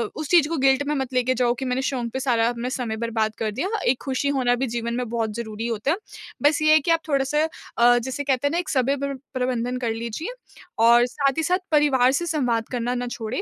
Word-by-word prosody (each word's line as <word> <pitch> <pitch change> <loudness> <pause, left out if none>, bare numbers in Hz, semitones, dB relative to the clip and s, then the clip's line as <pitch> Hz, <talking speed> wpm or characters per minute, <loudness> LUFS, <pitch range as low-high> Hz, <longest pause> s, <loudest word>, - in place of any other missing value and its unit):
उस 310 -1 -4
चीज़ 335 -4 +5
को 330 - -1
गिल्ट 270 +1 +3
में 300 - 0
मत 265 -1 -3
लेके 255 0 +2
जाओ 245 -2 +1
कि 265 - -3
मैंने 255 +1 -1
शौक 250 -3 -2
पे 265 - -2
सारा 235 -4 +2
अब 240 0 -4
समय 240 -4 -3
बर्बाद 220 -1 -1
कर 215 -1 -1
दिया। 265 - -2 0.2
एक 250 - +1
खुशी 270 +1 -1
होना 245 -1 +2
भी 260 +2 -2
जीवन 235 0 -3
में 250 -1 -2
बहुत 225 -2 -2
ज़रूरी 225 -1 -4
होता 230 +4 -1
है। 345 - 0 0.5
बस 295 +1 +3
ये 310 0 +4
है 315 - +7
कि 320 +3 -1
आप 330 - +4
थोड़ा-सा 280 +1 +1 0.3
अ, 240 +1 +6
जिसे 260 +4 -3
कहते 270 0 +1
हैं - - -1
ना 335 - -1
एक 355 - -2
समय 275 0 +1
प्र 280 0 -3 0.2
प्रबंधन 250 -1 -1
कर 240 -3 -2
लीजिए। 235 - -5 0.5
और 235 +1 +6
साथ 275 +3 -1
ही 320 - +1
साथ 360 +3 +2
परिवार 270 -4 +4
से 345 +5 -1
संवाद 245 -9 0
करना 245 0 -1
ना 245 0 -3
छोड़ें। 220 - -4
255 Hz, 245 wpm, -23 LUFS, 235-280 Hz, 0.5 s, है